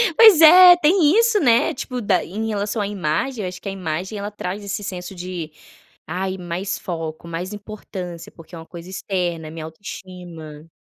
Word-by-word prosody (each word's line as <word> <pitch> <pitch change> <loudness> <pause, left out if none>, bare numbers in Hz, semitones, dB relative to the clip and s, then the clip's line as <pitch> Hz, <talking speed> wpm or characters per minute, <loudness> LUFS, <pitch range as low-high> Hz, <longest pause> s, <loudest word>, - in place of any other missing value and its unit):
Pois 435 -8 +8
é, 355 +3 +10
tem 340 +2 +4
isso, 460 -3 +3
né, 240 -2 +3
tipo 250 -1 -5
da 195 -3 +1
em 215 +5 -4
relação 205 +1 -2
à 200 - -1
imagem, 205 - -2
eu - - -2
acho 180 0 -10
que 200 - -5
a - - -3
imagem 185 +2 -4
ela 205 +1 -5
traz 200 0 -5
esse 200 +1 -4
senso 185 -1 -6
de 175 -3 -6 0.6
ai 190 +3 -3
mais 180 +2 -4
foco 165 -3 -6
mais 175 +4 -5
importância 190 -5 -8
porque 165 +1 -14
é - - -8
uma 165 - -10
coisa 170 +1 -11
externa 180 -4 -3
é 155 - -9
minha 160 -1 -7
autoestima. 165 -3 -10
190 Hz, 190 wpm, -21 LUFS, 170-215 Hz, 0.6 s, é